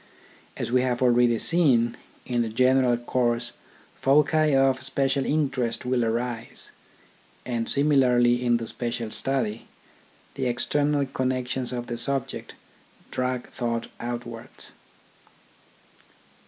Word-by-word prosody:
As - - -3
we 125 0 +4
have 125 0 0
already 120 -1 +4
seen, 130 -7 +3 0.3
in 120 -1 0
the 115 - -1
general 125 +1 +3
course 120 0 -1 0.4
foci 150 +2 +3
of 135 -1 +3
special 135 0 0
interest 135 -6 0
will 125 -1 +1
arise; 115 +1 -3 0.7
and 115 -2 -2
similarly 125 -4 +3
in 120 -1 +3
the 115 - -5
special 120 -1 -3
study, 120 -5 -2 0.7
the 130 -2 -2
external 145 +4 +1
connections 130 -1 -1
of 120 -1 -4
the 120 0 -5
subject 135 +2 -1 0.6
drag 125 -1 -2
thought 115 -2 -3
outwards. 120 -1 -5
125 Hz, 110 wpm, -25 LUFS, 120-135 Hz, 0.7 s, we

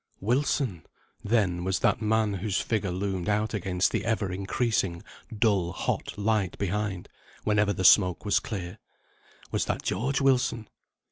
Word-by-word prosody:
Wilson! 120 - 0 0.4
then, 100 -6 +1
was 95 0 0
that - - +1
man 110 -1 +1
whose 100 +1 -1
figure 105 -4 -1
loomed 95 +1 -2
out 105 +2 0
against 90 -2 0
the - - -1
ever 105 -4 -1
increasing 95 -2 -1 0.3
dull 100 -6 +1
hot - - -3
light 105 -2 0
behind, 100 -1 -2 0.4
whenever 105 -1 +2
the 95 -1 -2
smoke 90 +1 +5
was 100 - +3
clear, 90 -5 -6 0.7
was - - 0
that - - -2
George 135 +4 0
Wilson? 125 -5 +1
105 Hz, 140 wpm, -27 LUFS, 95-110 Hz, 0.7 s, smoke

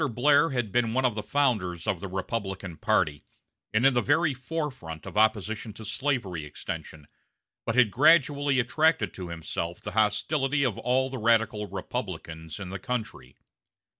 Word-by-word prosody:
Blair 145 +6 +4
had 120 -6 -2
been 115 0 +1
one 130 0 +2
of 125 - +2
the 105 - -3
founders 105 - 0
of 105 -5 0
the 100 - -5
Republican 95 -2 -4
party, 75 -1 +1 0.5
and 110 +4 +2
in 135 - +6
the 120 - +2
very 150 +2 +2
forefront 130 - -5
of - - -8
opposition 110 0 +1
to 110 +1 -10
slavery 100 - -2
extension, 75 0 -7 0.6
but 115 - 0
had 125 -5 +5
gradually 145 -1 +4
attracted 125 - +2
to 90 -2 -7
himself 85 +1 -4
the - - -6
hostility 135 +7 +1
of 125 -7 +1
all 130 +2 +1
the 130 - -4
radical 110 -2 +2
Republicans 80 -2 -6
in 95 -2 -6
the 100 - -5
country. 110 - -5
110 Hz, 160 wpm, -27 LUFS, 95-130 Hz, 0.6 s, in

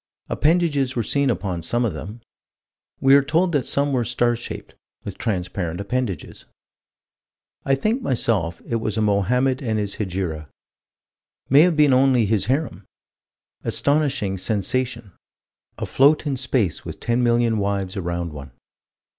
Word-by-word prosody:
Appendages 150 -5 +1
were 120 - 0
seen 140 +5 +1
upon 95 -6 -2
some 120 +9 0
of 110 - -1
them. 110 +5 -8 0.8
We 135 0 +5
are 140 - +7
told 165 +6 +1
that 145 -6 0
some 140 0 +1
were 125 -2 +1
star 120 0 +1
shaped, 120 - -8 0.3
with - - -8
transparent 90 -4 -3
appendages. 100 -1 -4 1.2
I 135 - +3
think, 220 - -1
myself, 105 - 0
it 115 - 0
was 110 -1 -3
a - - +1
Mohammed 125 +6 +1
and 110 -5 -1
his 100 -1 -3
Hegira. 90 -7 -3 1.0
May 140 +2 +8
have 175 0 +4
been 150 -3 +4
only 130 -3 +4
his 100 -2 +1
harem. 130 - -1 0.8
Astonishing 140 -10 0
sensation: 115 +2 -1 0.7
afloat 145 +4 +3
in 140 -2 -1
space 125 -8 -1
with - - -8
ten 120 +1 0
million 120 -2 +2
wives 100 -1 -2
around 85 -3 -3
one. 70 -1 -9
120 Hz, 140 wpm, -22 LUFS, 100-135 Hz, 1.2 s, May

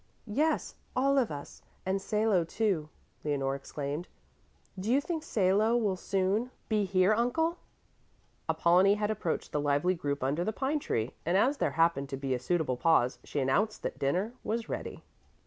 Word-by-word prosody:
"Yes, 295 +9 0 0.2
all 275 +2 +3
of 245 - +1
us, 145 -1 -8 0.2
and 190 +1 0
Salo, 210 -3 +2
too," 165 -3 -1 0.3
Leonore 135 -2 0
exclaimed. 145 +4 -4 0.7
"Do 205 +5 -1
you 265 - +5
think 320 +2 -3
Salo 215 -1 +2
will 210 -5 +1
soon 195 +6 0 0.2
be 210 -2 +2
here, 185 +1 +3
Uncle?" 320 +10 +1 0.9
Apollonie 185 +4 +4
had 210 0 0
approached 195 -6 -2
the 150 - 0
lively 145 +5 +2
group 145 -6 -3
under 145 +6 0
the 215 - 0
pine 275 +6 0
tree, 115 - -1
and 175 +3 +2
as 265 +8 +3
there - - 0
happened 165 -5 +2
to 135 - -4
be 135 -1 -2
a 125 - -1
suitable 145 -1 0
pause, 125 -5 +3
she 145 - -3
announced 205 +12 +1
that - - -4
dinner 180 - 0
was 225 +1 -2
ready. - - -5
185 Hz, 165 wpm, -30 LUFS, 145-220 Hz, 0.9 s, you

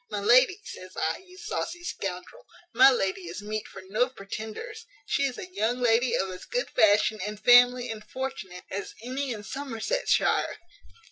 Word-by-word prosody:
My 205 - -3
lady! 255 - +5
says 185 - -10
I, 160 - 0
you 365 0 -17
saucy 350 -4 -4
scoundrel; 195 - -6 0.3
my 265 +1 +8
lady 195 -7 -1
is 175 +5 -7
meat 215 +1 -4
for 195 - -11
no 230 +6 +1
pretenders. 255 - -8 0.2
She 280 - +1
is 255 -3 -3
a 365 0 -9
young 245 - 0
lady 240 +1 +3
of 190 0 -1
as 180 - -9
good - - -2
fashion, 215 +1 +4
and 210 +1 -5
family, 245 +2 +6
and 215 -1 -7
fortune, 210 -7 -6
as 200 +1 -5
any 260 +2 -3
in 210 -3 -5
Somersetshire. 280 - 0
240 Hz, 165 wpm, -27 LUFS, 205-275 Hz, 0.3 s, my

